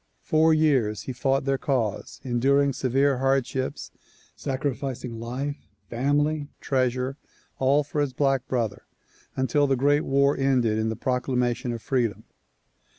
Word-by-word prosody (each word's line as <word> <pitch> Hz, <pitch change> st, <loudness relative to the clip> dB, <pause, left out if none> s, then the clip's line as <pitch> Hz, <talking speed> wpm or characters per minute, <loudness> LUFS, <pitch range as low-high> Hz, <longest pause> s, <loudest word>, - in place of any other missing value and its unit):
Four 155 Hz, -, +3 dB
years 130 Hz, -10 st, +2 dB
he 130 Hz, -, -5 dB
fought 135 Hz, +2 st, 0 dB
their 135 Hz, -1 st, +1 dB
cause, 120 Hz, -8 st, -2 dB
enduring 135 Hz, +3 st, +2 dB
severe 135 Hz, +1 st, +1 dB
hardships, 135 Hz, -1 st, -1 dB, 0.4 s
sacrificing 130 Hz, -3 st, -3 dB
life, 130 Hz, +5 st, -5 dB, 0.2 s
family, 145 Hz, +4 st, +1 dB
treasure, 130 Hz, 0 st, -1 dB, 0.4 s
all 140 Hz, +3 st, +3 dB
for 145 Hz, +1 st, -2 dB
his 145 Hz, -2 st, 0 dB
black 135 Hz, -1 st, 0 dB
brother 115 Hz, -5 st, -2 dB, 0.5 s
until 140 Hz, +2 st, +2 dB
the 135 Hz, -, +2 dB
great 145 Hz, +3 st, +3 dB
war 140 Hz, 0 st, +2 dB
ended 125 Hz, -5 st, +2 dB
in 110 Hz, 0 st, 0 dB
the 110 Hz, -, -2 dB
proclamation 125 Hz, -1 st, -1 dB
of 115 Hz, -1 st, -6 dB
freedom. 115 Hz, -6 st, -1 dB
135 Hz, 130 wpm, -25 LUFS, 120-140 Hz, 0.5 s, Four